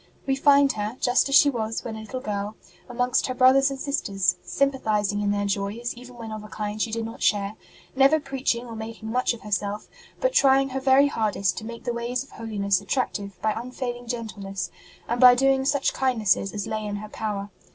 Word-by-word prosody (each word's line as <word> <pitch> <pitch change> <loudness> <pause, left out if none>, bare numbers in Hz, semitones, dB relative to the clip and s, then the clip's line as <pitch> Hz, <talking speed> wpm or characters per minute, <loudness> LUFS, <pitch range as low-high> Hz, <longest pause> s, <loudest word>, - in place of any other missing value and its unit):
We 270 - +1
find 280 0 +5
her, 215 +1 -4
just 250 +2 +2
as 275 - +3
she 285 - +7
was 225 -3 -3
when 225 - -5
a - - -7
little 255 +4 -6
girl, 205 -2 -3 0.3
amongst 245 +1 +1
her 255 - -3
brothers 265 +2 +5
and 275 -1 -6
sisters, 195 -11 0
sympathizing 215 -7 0
in 205 - 0
their 205 0 0
joys 200 +4 -2
even 245 0 -13
when 225 -2 -7
of 215 -1 -6
a - - -9
kind 210 0 -4
she 230 - 0
did 225 0 -2
not 225 +1 -8
share; 205 0 +1 0.4
never 275 +4 +5
preaching 270 -4 -2
or 230 -2 -8
making 220 0 -7
much 250 0 +1
of 230 - -15
herself, 205 0 -2 0.3
but - - +1
trying 275 - +4
her 265 +1 -3
very 265 +1 +5
hardest 215 -7 0
to 220 - -10
make 235 0 -8
the 240 - -2
ways 240 +2 -2
of 275 - -20
holiness 200 -4 -1
attractive 200 -3 -3
by 215 - +2
unfailing 245 +1 -5
gentleness, 210 -5 -5 0.4
and 240 +2 -1
by 250 -1 +9
doing 270 +1 +2
such 280 0 +1
kind 260 -2 0
nesses 195 -2 +2
as 205 -2 -4
lay 215 0 -3
in 205 -1 -3
her 210 +1 -7
power. 205 -2 -4
230 Hz, 210 wpm, -25 LUFS, 210-260 Hz, 0.4 s, by